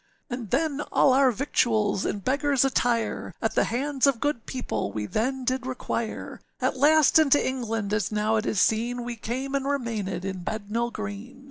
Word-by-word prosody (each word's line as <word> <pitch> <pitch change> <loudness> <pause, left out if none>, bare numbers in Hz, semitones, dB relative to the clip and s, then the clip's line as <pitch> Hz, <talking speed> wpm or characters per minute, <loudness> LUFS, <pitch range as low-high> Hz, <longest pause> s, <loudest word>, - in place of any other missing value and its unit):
âAnd 240 -4 -5
then 295 - 0
all 265 - +4
our 270 0 +5
victuals 220 -5 +1
in 200 - -3
beggarâs 275 +3 +2
attire, 245 -3 0
At - - -1
the - - +2
hands 275 +3 0
of 270 -4 +2
good 290 -4 -2
people 255 -2 -3
we 105 -1 -3
then 255 - -1
did 255 0 -1
require; 235 -3 -4 0.2
At - - 0
last 305 +2 +5
into 290 -2 +5
England, 225 -5 -2
as 210 -2 0
now 215 +1 +1
it 215 - -1
is 210 - 0
seen, 240 +4 +1
We 240 0 -4
came, 255 +5 -4
and 275 -1 0
remainèd 230 -9 -2
in 190 -2 -4
Bednall 220 +4 -2
Green. 215 +4 -7
240 Hz, 175 wpm, -26 LUFS, 215-270 Hz, 0.2 s, our